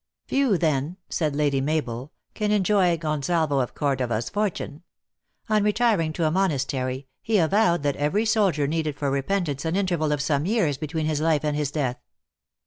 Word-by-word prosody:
"Few, 265 -8 +2
then," 155 +1 0
said 155 -4 -1
Lady 145 -2 +1
Mabel, 135 -3 -2 0.2
"can 210 -1 -1
enjoy 195 -4 +3
Gon 155 -2 -2
salvo 160 -3 +1
of 125 - -2
Cordova 130 -5 0
s 110 +2 -3
fortune. 195 -7 -2 0.7
On 215 -2 +2
retiring 210 -6 +2
to 165 0 -1
a 155 - +2
monas 165 -7 +1
tery, 130 0 -3 0.2
he 220 -1 +1
avowed 175 -2 +3
that 145 -1 0
every 165 +10 +1
soldier 200 -9 +2
needed 155 0 -1
for 140 -1 -1
repent 170 +7 0
ance 140 -1 -3
an 165 +1 -1
interval 175 -6 0
of 150 - 0
some 145 +2 0
years 185 - +1
between 155 +1 -2
his 155 -1 0
life 155 -2 +2
and 150 -1 0
his 150 -2 -1
death." 135 -5 -2
155 Hz, 185 wpm, -25 LUFS, 140-190 Hz, 0.7 s, enjoy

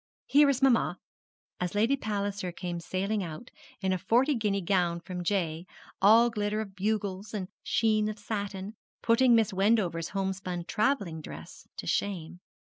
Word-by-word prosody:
Here 290 0 +5
is 270 -1 0
mamma,' 255 -4 +3 0.6
as 180 +2 -2
Lady 225 +6 +3
Palliser 200 -6 -3
came 175 0 -5
sailing 195 +4 -2
out, 175 +7 -7 0.3
in 190 -1 +1
a 185 - -1
forty 255 - +3
guinea 210 -5 0
gown 175 -2 +1
from 180 +1 -6
Jay, 170 -2 -1 0.3
all 225 +4 +6
glitter 210 -1 -1
of 200 -3 -6
bugles, 200 0 -2
and 190 -3 -4
sheen 215 -1 +2
of 215 - -5
satin, 205 -1 -4 0.3
putting 240 +1 +5
Mrs. 220 -2 +2
Wendover's 190 -4 +1
homespun 190 -3 -3
travelling 205 - 0
dress 80 - -10
to - - -6
shame. 180 -4 -2
200 Hz, 150 wpm, -29 LUFS, 180-220 Hz, 0.6 s, all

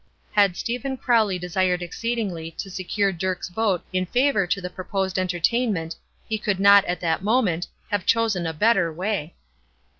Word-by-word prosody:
Had 200 -4 +3
Stephen 250 +3 -3
Crowley 225 -7 +2
desired 180 0 0
exceedingly 195 -4 -3
to 195 - -5
secure 195 +2 0
Dirk's 185 +1 -3
vote 190 -2 0
in 185 0 0
favor 245 -4 +2
to 200 - 0
the 180 - -5
proposed 190 0 -2
entertainment 180 -1 0 0.3
he 220 -1 -2
could 205 -2 -1
not, 200 0 +7
at 175 -1 -3
that 165 -1 0
moment, 205 -6 +1 0.2
have 205 -3 -1
chosen 220 -7 +2
a 160 - -3
better 195 -1 +3
way. 180 -1 -3
190 Hz, 155 wpm, -24 LUFS, 175-220 Hz, 0.3 s, not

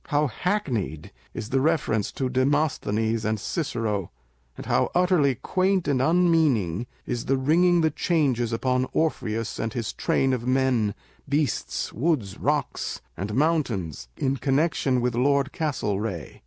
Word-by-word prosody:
How 145 +1 +2
hackneyed 120 - -2 0.2
is 110 -2 -5
the 135 0 +2
reference 140 -9 +1
to 130 - -1
Demosthenes 125 -5 0
and 110 0 0
Cicero, 110 - -2 0.5
and - - -8
how - - +2
utterly 175 -7 +3
quaint 185 - 0
and 135 -3 +2
unmeaning 145 - +2 0.2
is 120 -1 -3
the 135 - +2
ringing 170 +6 +3
the 160 -1 +2
changes 140 -8 +1
upon 125 +2 0
Orpheus 115 -8 -1
and 110 0 -2
his 115 -4 -3
train 135 -1 +1
of 125 -1 -3
men, 125 -5 +2 0.3
beasts, 145 0 -1
woods, 125 - -1
rocks, - - -1 0.2
and 100 +3 -4
mountains 130 - 0
in 135 0 0
connection 135 -2 +1
with 125 0 0
Lord 140 +3 +2
Castlcreagh! 105 - -3
130 Hz, 135 wpm, -25 LUFS, 110-155 Hz, 0.5 s, utterly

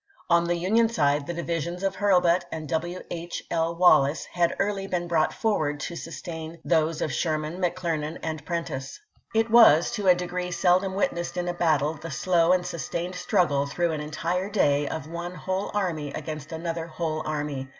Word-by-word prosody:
On 170 0 +5
the 175 0 +1
Union 220 +7 +2
side 145 -8 +1
the 175 - -2
divisions 170 +1 -3
of 195 0 -1
Hui 205 0 +1
lbut 180 -1 +4
and 155 -1 -5
W. 170 +4 -2
H. 175 0 -5
L. 165 0 0
Wallace 160 -4 +4
had 175 -1 0
early 195 -1 -1
been 175 -2 -2
brought 165 -2 +2
forward 155 -10 0
to 170 - -4
sustain 165 -1 -7
those 160 -1 +1
of 145 - -2
Sherman, 155 +3 -2
McClernand, 170 -3 -1
and 155 -2 -4
Prentiss. 160 -6 -4 0.4
It 225 0 +2
was, 220 -9 +7
to 205 -2 -2
a 180 - +7
degree 180 0 -3
seldom 185 +2 +2
witnessed 175 -2 -1
in 175 0 -1
a 175 - -1
battle, 155 -4 +2
the 165 - -6
slow 170 +2 +2
and 180 -1 +2
sustained 170 +2 -4
struggle, 170 -7 +1
through 170 +4 0
an 155 -1 -3
entire 170 +5 -2
day, 145 -8 +2
of 150 0 -4
one 170 +2 -5
whole 190 +2 -2
army 165 -8 -1
against 155 -1 -6
another 165 0 -4
whole 155 -1 -3
army. 145 -3 -3
170 Hz, 180 wpm, -26 LUFS, 155-180 Hz, 0.4 s, was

